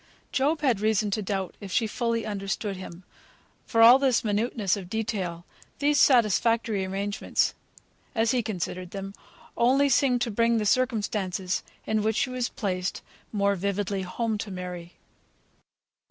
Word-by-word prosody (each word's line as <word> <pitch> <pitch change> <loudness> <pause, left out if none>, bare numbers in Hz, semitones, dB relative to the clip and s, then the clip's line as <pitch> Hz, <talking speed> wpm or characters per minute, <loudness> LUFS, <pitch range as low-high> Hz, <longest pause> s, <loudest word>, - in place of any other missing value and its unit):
Job 295 +4 +1
had 255 -8 +2
reason 215 -1 +1
to 215 - 0
doubt 195 -2 -3
if 200 -2 -7
she 230 - +2
fully 230 0 -1
understood 200 -1 -3
him; 185 -1 -9 0.6
for 225 0 +4
all 245 +3 +9
this 265 -3 +2
minuteness 210 -2 0
of 190 -3 -8
detail, 190 -6 -3 0.3
these 290 +1 +2
satisfactory 230 -3 +3
arrangements, 200 +2 -1 0.6
as 225 0 +2
he 255 -2 +2
considered 185 -4 -4
them, 195 +1 -6 0.4
only 265 +4 +4
seemed 255 -1 +3
to 235 - -1
bring 230 +2 +2
the 215 - 0
circumstances 205 -6 0 0.2
in 220 0 +1
which 220 +1 0
she 255 - 0
was 250 -1 -1
placed 185 -5 -3 0.3
more 200 -1 +2
vividly 200 +1 -2
home 215 +4 -2
to 220 - -5
Mary. 180 -2 -7
210 Hz, 145 wpm, -26 LUFS, 195-235 Hz, 0.6 s, all